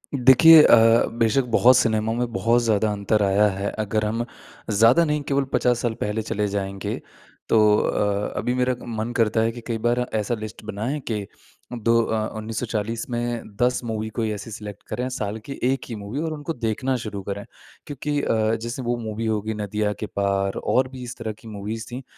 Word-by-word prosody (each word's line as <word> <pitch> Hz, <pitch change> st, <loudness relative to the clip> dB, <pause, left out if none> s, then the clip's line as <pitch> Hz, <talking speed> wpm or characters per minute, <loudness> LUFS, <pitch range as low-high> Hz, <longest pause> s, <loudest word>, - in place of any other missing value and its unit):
देखिए 140 Hz, +5 st, +8 dB
अ, 115 Hz, -2 st, +6 dB
बेशक 115 Hz, +4 st, +3 dB
बहुत 125 Hz, +2 st, +6 dB
सिनेमा 110 Hz, 0 st, +1 dB
में 120 Hz, 0 st, -2 dB
बहुत 115 Hz, +6 st, +2 dB
ज़्यादा 110 Hz, -1 st, +2 dB
अंतर 105 Hz, +1 st, +1 dB
आया 100 Hz, +2 st, +4 dB
है 100 Hz, +1 st, -3 dB
अगर 110 Hz, 0 st, 0 dB
हम 115 Hz, +2 st, -1 dB, 0.5 s
ज़्यादा 115 Hz, +10 st, +5 dB
नहीं 150 Hz, -1 st, 0 dB
केवल 140 Hz, 0 st, +1 dB
50 125 Hz, -1 st, +2 dB
साल 120 Hz, -2 st, 0 dB
पहले 105 Hz, +2 st, -1 dB
चले 105 Hz, -1 st, -2 dB
जाएँगे 100 Hz, -1 st, -3 dB, 0.5 s
तो 110 Hz, -, +5 dB, 0.2 s
अ, 105 Hz, -1 st, 0 dB
अभी 125 Hz, -, 0 dB
मेरा 125 Hz, 0 st, +1 dB
मन 115 Hz, 0 st, -3 dB
करता 110 Hz, -1 st, +2 dB
है 115 Hz, +1 st, +1 dB
कि 120 Hz, 0 st, -9 dB
कई 115 Hz, -2 st, -1 dB
बार 120 Hz, +2 st, +1 dB
ऐसा 110 Hz, +2 st, 0 dB
लिस्ट 110 Hz, 0 st, -8 dB
बनाएँ 110 Hz, +8 st, -3 dB
कि 105 Hz, -2 st, -3 dB, 0.5 s
2 115 Hz, 0 st, +2 dB
अ, 110 Hz, -1 st, -1 dB
1940 110 Hz, 0 st, -3 dB
में 120 Hz, -3 st, -3 dB
10 125 Hz, +1 st, +2 dB
मूवी 110 Hz, -1 st, -3 dB
कोई 110 Hz, -1 st, 0 dB
ऐसे 105 Hz, +2 st, -7 dB
सेलेक्ट 105 Hz, -2 st, -8 dB
करें 125 Hz, +1 st, -3 dB
साल 110 Hz, -4 st, -4 dB
की 140 Hz, -, -7 dB
1 130 Hz, +2 st, +1 dB
ही 115 Hz, -, -4 dB
मूवी 105 Hz, +6 st, -5 dB
और 160 Hz, -1 st, -2 dB
उनको 155 Hz, +2 st, -4 dB
देखना 120 Hz, +2 st, -1 dB
शुरू 100 Hz, -2 st, -5 dB
करें। 100 Hz, +1 st, -5 dB, 0.4 s
क्योंकि 145 Hz, 0 st, -2 dB
अ, 110 Hz, -2 st, +1 dB
जैसे 115 Hz, +3 st, -5 dB
वो 120 Hz, -1 st, -1 dB
मूवी 110 Hz, 0 st, -4 dB
होगी 110 Hz, 0 st, -1 dB
नदिया 105 Hz, 0 st, -2 dB
के -, -, -3 dB
पार 100 Hz, -1 st, -1 dB
और 130 Hz, +1 st, +2 dB
भी 130 Hz, -1 st, -9 dB
इस 120 Hz, 0 st, -7 dB
तरह 115 Hz, -2 st, -4 dB
की 115 Hz, -, -14 dB
मूवीज़ 105 Hz, +2 st, -5 dB
थी। 125 Hz, +2 st, -6 dB
110 Hz, 190 wpm, -23 LUFS, 105-120 Hz, 0.5 s, देखिए